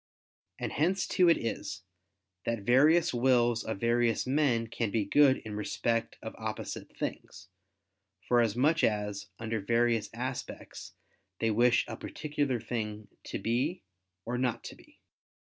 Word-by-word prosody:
And - - -3
hence 180 +6 +1
too 180 -2 +4
it 165 - +5
is, 105 -4 -4 0.6
that 115 -3 -2
various 150 +9 +4
wills 120 -2 +3
of 110 -3 -4
various 115 -1 +2
men 130 -4 +2
can 115 -1 -2
be 105 0 0
good 135 +5 +5
in 110 - -6
respect 115 +2 -1
of 110 - -6
opposite 110 -1 -6
things, - - -6 0.8
for 120 -1 +4
as 115 -3 +1
much 155 +6 +2
as, 105 -2 0
under 110 0 -3
various 115 +1 +1
aspects, 125 +3 -6 0.4
they 115 +2 +1
wish 120 +3 +3
a 110 - -6
particular 145 -4 -2
thing 105 -3 -4 0.2
to - - -4
be 130 +10 -1 0.4
or 125 +1 -2
not 120 -2 -1
to - - -8
be. - - -21
120 Hz, 145 wpm, -30 LUFS, 110-130 Hz, 0.8 s, it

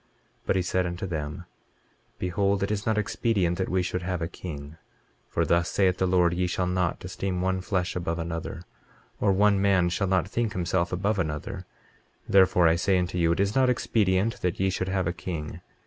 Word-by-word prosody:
23:7 - - -39 0.4
But - - +2
he 95 - +2
said 90 0 0
unto 85 +2 -4
them: 80 0 -4 0.7
Behold, 100 +2 0
it 100 - -1
is 105 0 -2
not 110 -1 +2
expedient 100 -4 0
that 95 - -1
we 95 0 +1
should 90 0 -2
have 90 0 -2
a 80 - -2
king; 75 -3 -8 0.5
for - - 0
thus 85 0 +2
saith 95 -2 +2
the 95 - +2
Lord: 90 -2 +3
Ye 90 +1 0
shall 90 0 -1
not 90 -1 -1
esteem 95 0 -3
one 95 0 0
flesh 90 -2 -1
above 85 -2 -2
another, 85 -1 -5 0.6
or 100 - +3
one 100 0 +3
man 95 -3 +3
shall 95 +3 -1
not 95 0 +1
think 115 +1 -1
himself 85 -1 0
above 100 +3 0
another; 75 -4 -4 0.6
therefore 95 -3 +5
I 80 +1 +3
say 95 +2 +2
unto 90 0 -1
you 85 -1 +3
it - - -4
is 100 +1 +1
not 130 0 +3
expedient 105 -3 +1
that 90 -1 -1
ye 95 0 +2
should 95 0 -2
have 95 -1 0
a 85 - -1
king. 80 -1 -6
90 Hz, 205 wpm, -26 LUFS, 85-95 Hz, 0.7 s, therefore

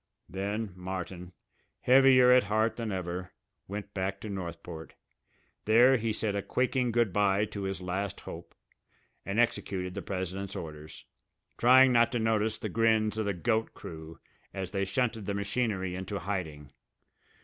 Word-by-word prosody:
Then 100 +2 -3
Martin, 90 -1 -6 0.5
heavier 130 -1 +6
at 125 -3 +6
heart 110 +2 +1
than 115 -3 -4
ever, 90 -1 -4 0.3
went 100 +1 -6
back 95 0 -2
to 110 - -6
Northport. 85 -3 -7 0.7
There 120 +5 +6
he 115 -1 -1
said 105 -1 -1
a 100 - 0
quaking 125 +2 0
good 115 -5 +1
bye 100 +1 +2
to 105 -1 -7
his 95 -1 -3
last 95 +2 -3
hope 85 0 -10 0.7
and 100 +3 -1
executed 95 -6 0
the - - -5
president's 95 +1 -4
orders, 75 -1 -8 0.5
trying 130 +2 +6
not 120 0 +4
to 120 - 0
notice 110 -1 +1
the - - -4
grins 110 -1 +2
of 110 - -1
the 100 - 0
"goat" 110 +4 -1
crew 80 0 -9 0.4
as 95 -2 -4
they 100 -1 -1
shunted 115 -1 -1
the 100 - -1
machinery 100 -2 -1
into 95 +2 -4
hiding. 80 -7 -5
100 Hz, 150 wpm, -29 LUFS, 90-115 Hz, 0.7 s, heavier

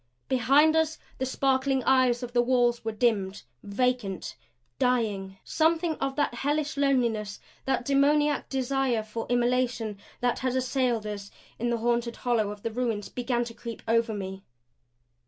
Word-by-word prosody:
Behind 275 +5 +4
us 320 -1 +1 0.2
the 260 - -1
sparkling 265 0 +1
eyes 255 -2 +3
of 240 0 -6
the 240 - +4
wall 240 -1 +3
were 225 - -2
dimmed, 210 -4 0 0.2
vacant 210 -2 -1 0.4
dying. 210 -6 0
Something 325 +1 +1
of 275 0 -2
that 290 -4 +1
hellish 295 +4 -1
loneliness, 235 -7 +1 0.3
that 265 -2 0
demoniac 290 +1 +2
desire 265 -3 0
for 220 +1 -5
immolation 245 -3 0 0.2
that 245 -1 0
had 255 -1 -1
assailed 250 -3 0
us 205 -1 -5 0.3
in 240 +2 0
the 235 - +1
haunted 235 0 0
hollow 230 -4 0
of 205 0 -8
the 230 - -2
ruins 225 -3 -2
began 245 -1 -1
to 235 -1 -7
creep 230 -1 -8
over 230 -1 +2
me. 190 -1 -5
245 Hz, 150 wpm, -27 LUFS, 225-265 Hz, 0.4 s, Behind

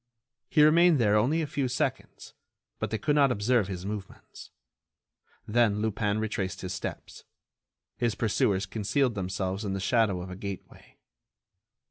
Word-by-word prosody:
He 150 - +5
remained 165 +2 +6
there 105 -4 +3
only 140 +10 +2
a - - -1
few 145 -2 -2
seconds, 125 0 -3 0.5
but - - -2
they 110 - -1
could 150 +6 0
not 140 -3 +4
observe 115 -1 +1
his 95 -2 -6
movements. 100 -2 -8 1.0
Then 110 -2 +2
Lupin 105 -1 -1
retraced 105 -3 -3
his 95 0 -4
steps. 95 - -7 0.7
His 115 -4 0
pursuers 100 -3 +1
concealed 115 +6 0
themselves 95 +1 -3
in 100 -2 -2
the 95 - -2
shadow 105 -2 +1
of 90 +1 -7
a - - -6
gateway. 100 -1 -9
105 Hz, 145 wpm, -28 LUFS, 95-125 Hz, 1.0 s, remained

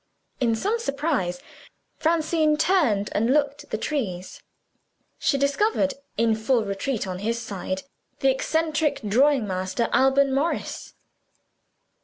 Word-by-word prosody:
In 235 -3 +2
some 420 - -1
surprise, 275 - -1 0.6
Francine 315 -1 +2
turned, 300 - +2
and 225 +4 +1
looked 285 0 +1
at - - -32
the - - -2
trees. 205 -10 -4 0.8
She 300 -3 +2
discovered 280 +2 +1 0.2
in 225 0 +3
full 220 +1 +1
retreat, 205 +5 -2
on 185 -1 -5
his 230 +4 -1
side 190 -4 -4 0.4
the 270 -1 +4
eccentric 310 +2 0
drawing 265 +3 +3
master, 185 +4 -2
Alban 270 +1 +4
Morris. 290 +5 -2
270 Hz, 120 wpm, -24 LUFS, 215-300 Hz, 0.8 s, the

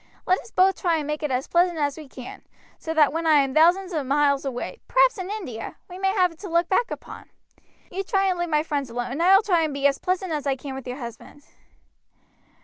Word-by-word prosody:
Let 370 - +2
us - - -13
both 385 -2 +2
try 340 -3 +2
and 300 - -3
make 300 +1 -3
it 300 - -1
as 255 0 -1
pleasant 345 0 +2
as 285 -2 0
we 310 -2 -10
can, 255 -2 -10 0.4
so 320 - -5
that 300 -2 +4
when 330 0 -1
I 310 - +6
am 270 -1 -3
thousands 355 +5 +4
of 295 -5 -2
miles 280 0 +2
away, 265 - -5
perhaps - - +3
in 370 0 -5
India, 345 - -6
we 360 0 -10
may 385 0 +1
have 365 -3 +3
it 325 - -18
to 395 - -7
look 340 +1 +2
back 460 +5 +2
upon. - - -9 0.6
You 380 - -3
try 390 -1 +1
and 370 -2 0
leave 345 0 -1
my 300 -1 +2
friends 285 -4 -3
alone 245 +1 -4
and 285 +6 -3
I 370 +3 +6
will 400 - +5
try 360 -6 +2
and 310 -3 -1
be 280 0 -3
as 280 -1 +3
pleasant 370 0 -2
as 295 -2 -2
I 270 - +1
can 270 +1 -8
with 265 -1 -8
your 250 +1 -5
husband." 235 +3 -10
320 Hz, 250 wpm, -24 LUFS, 280-370 Hz, 0.6 s, I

